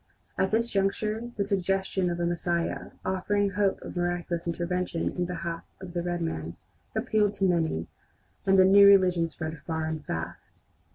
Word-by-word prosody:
At 190 - +1
this 230 +3 +1
juncture 210 +4 0
the 200 - +2
suggestion 195 -1 0
of 175 0 -3
a 175 - +1
Messiah, 170 0 -1 0.2
offering 200 +2 +1
hope 195 0 +1
of - - -8
miraculous 175 -1 -2
intervention 175 0 -1
in 180 - -2
behalf 170 -1 -4 0.2
of 185 -2 -9
the 175 - -1
red 175 0 -2
man, 80 - -4 0.4
appealed 210 -2 +2
to 195 - 0
many, 165 - +1 0.6
and 195 0 +4
the 185 - +7
"new 200 +1 +8
religion" 180 -4 +5
spread 160 -1 -6
far 160 -1 -2
and 160 -1 -3
fast. 80 - -6
180 Hz, 165 wpm, -28 LUFS, 170-195 Hz, 0.6 s, new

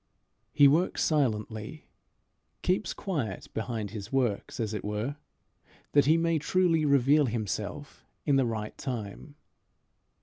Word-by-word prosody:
He 145 - +6
works 160 +6 +2
silently 115 -2 -1 0.8
keeps 185 +3 +1
quiet 140 - -3
behind 110 -3 -3
his 105 0 -7
works, 125 -6 -1
as 110 -2 -2
it 105 - -4
were, 105 +7 -3 0.7
that 145 -2 +5
he 160 +2 +5
may 165 -1 +1
truly 165 0 +2
reveal 140 +1 +4
himself 110 +5 -4 0.2
in 145 - +3
the 135 -2 +3
right 110 -2 -4
time. 125 +3 -6
130 Hz, 125 wpm, -29 LUFS, 110-150 Hz, 0.8 s, He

